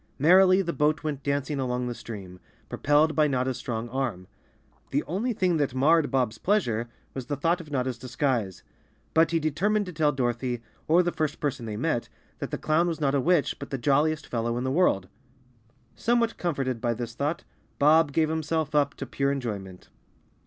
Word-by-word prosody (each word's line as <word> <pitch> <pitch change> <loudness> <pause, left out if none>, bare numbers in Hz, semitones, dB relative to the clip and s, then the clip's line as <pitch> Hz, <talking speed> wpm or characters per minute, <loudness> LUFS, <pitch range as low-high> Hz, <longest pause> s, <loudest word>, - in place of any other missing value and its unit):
Merrily 185 +5 +6
the 170 -1 -2
boat 150 +1 +1
went 150 -3 -3
dancing 140 0 -1
down 125 -1 -1
the 120 - -3
stream, 95 -6 -9 0.3
propelled 150 +2 +2
by 155 -1 +4
Not 130 -3 0
ta's 130 -1 -3
strong 115 -2 -4
arm. 120 -8 -3 0.6
The 145 - 0
only 205 +10 -2
thing 185 -6 +1
that 140 -4 -1
marred 155 +3 +4
Bob's 125 -5 0
pleasure 120 - 0 0.2
was 130 -2 -6
the 145 - -1
thought 165 +5 +1
of 155 - -13
Notta's 130 -4 -2
disguise. 125 - -2 0.5
But 160 0 +4
he 165 - +1
determined 195 +8 +1
to 180 - -7
tell 150 -2 +2
Dorothy, 120 -2 -2 0.2
or 170 +3 +5
the 175 - 0
first 155 -2 -2
person 130 -5 -2
they 105 -1 -4
met, 125 -2 -1 0.3
that - - -4
the - - -3
clown 160 +3 +2
was 165 -2 -2
not 140 -3 +1
a 140 - +2
witch, 170 0 +2
but 140 - -7
the 135 - -2
j 130 +3 0
oiliest 150 +2 +2
fellow 115 0 -2
in 125 - -2
the 130 - -1
world. 135 - +2 0.9
Somewhat 235 -1 +1
comforted 135 -8 -2
by 120 -1 0
this 120 0 -5
thought, 145 +7 -2 0.3
Bob 155 +1 +5
gave 155 +1 +2
himself 160 -1 -1
up 145 -1 +2
to - - -5
pure 140 0 0
enjoyment. 100 -9 -5
145 Hz, 195 wpm, -27 LUFS, 125-160 Hz, 0.9 s, Merrily